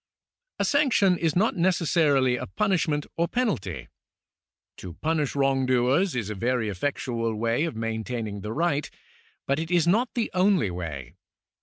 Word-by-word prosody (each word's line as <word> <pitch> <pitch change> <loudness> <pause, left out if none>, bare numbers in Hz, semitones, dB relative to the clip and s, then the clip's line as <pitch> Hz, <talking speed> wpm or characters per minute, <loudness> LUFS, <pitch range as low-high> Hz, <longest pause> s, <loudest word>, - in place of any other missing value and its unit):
^ - - -65 0.5
A - - 0
sanction 255 -10 +3
is 165 -2 -1
not 210 +5 +2
necessarily 160 -7 +2
a 125 +1 -5
punishment 170 -8 0
or 170 +1 +1
penalty. 190 - -2 0.9
To 90 -2 -8
punish 155 -3 -1
wrongdoers 135 +4 +2
is 110 -4 -2
a - - -2
very 115 +2 -1
effectual 115 +1 -2
way 115 +7 0
of 165 - -4
maintaining 110 -2 -4
the 105 +2 -5
right, 150 +1 0 0.6
but 140 +2 0
it 160 0 -4
is 175 -3 +3
not 225 +8 +2
the 235 -2 -1
only 185 - +2
way. 75 -6 -6
140 Hz, 150 wpm, -26 LUFS, 115-175 Hz, 0.9 s, sanction